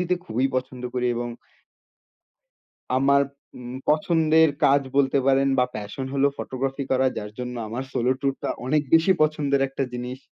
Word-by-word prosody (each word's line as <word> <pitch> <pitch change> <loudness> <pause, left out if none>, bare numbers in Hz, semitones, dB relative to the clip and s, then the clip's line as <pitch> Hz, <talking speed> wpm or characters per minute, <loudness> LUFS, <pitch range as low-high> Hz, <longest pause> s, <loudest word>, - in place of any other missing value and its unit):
দিতে 180 0 +1
খুবই 125 +4 0
পছন্দ 130 -1 -4
করি 125 -1 0
এবং 120 0 -3 1.7
আমার 140 +1 +4 0.3
উম 125 0 -8
পছন্দের 160 +1 +4 0.2
কাজ 140 +1 +5 0.2
বলতে 140 0 +3
পারেন 135 0 +4
বা 125 - +5
প্যাশন 105 +6 -5
হলো 140 +1 +3
ফটোগ্রাফি 135 +1 -3
করা 130 0 +3
যার 105 0 -5
জন্য 125 0 -4
আমার 120 +4 -4
সোলো 125 +2 +1
ট্যুরটা 135 -1 -2 0.2
অনেক 150 +3 +2
বেশি 165 +3 +6
পছন্দের 145 -3 +1
একটা 135 0 -2
জিনিস। 125 +1 -5
135 Hz, 150 wpm, -24 LUFS, 125-140 Hz, 1.7 s, বেশি